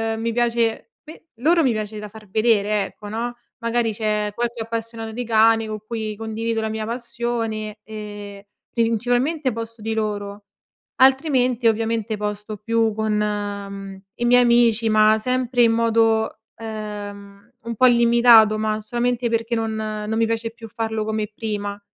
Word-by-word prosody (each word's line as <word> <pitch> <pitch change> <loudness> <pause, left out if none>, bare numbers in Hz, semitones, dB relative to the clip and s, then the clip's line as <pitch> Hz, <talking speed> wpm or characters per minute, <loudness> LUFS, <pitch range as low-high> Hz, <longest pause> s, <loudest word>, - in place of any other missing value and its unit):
uhm, 220 - -5
mi 230 0 0
piace 235 - 0
pe 315 +1 -14
loro 325 +7 +3
mi 260 - +3
piace 215 -1 -4
da 210 0 -6
far 215 -1 -14
vedere 215 -1 +2
ecco, 210 +2 -11
no, 235 +3 -3 0.2
magari 230 0 0
c'è 210 -1 -1
qualche 240 0 -2
appassionato 225 0 -5
di 245 +2 -4
cani 225 0 +4
con 215 0 -5
cui 220 -2 -3
condivido 225 +1 -3
la 220 - -2
mia 220 0 -3
passione 230 -2 -3
e 205 -2 -8 0.2
principalmente 245 +6 0
posto 230 0 -7
di 220 +1 -2
loro. 205 -1 -3 0.5
Altrimenti 260 -3 +3
ovviamente 225 -1 0
posto 210 +1 -4
più 225 +1 +1
con, 220 0 0
mhmm, 200 -2 -3
i 240 - -2
miei 245 +1 +6
amici, 235 -2 +4
ma 215 0 +5
sempre 250 +1 0
in 230 -1 +6
modo, 225 -1 +2 0.2
ehm, 205 -1 -8
un 230 0 -4
po' 255 - +4
limitato, 235 -2 +6
ma 215 0 -1
solamente 240 +2 -1
perché 230 +1 -1
non 225 -1 -2
non 215 0 -3
mi 225 - +3
piace 230 0 -2
più 230 0 -11
farlo 220 -1 -3
come 215 0 -2
prima. 205 -2 -4
225 Hz, 155 wpm, -22 LUFS, 215-235 Hz, 0.5 s, miei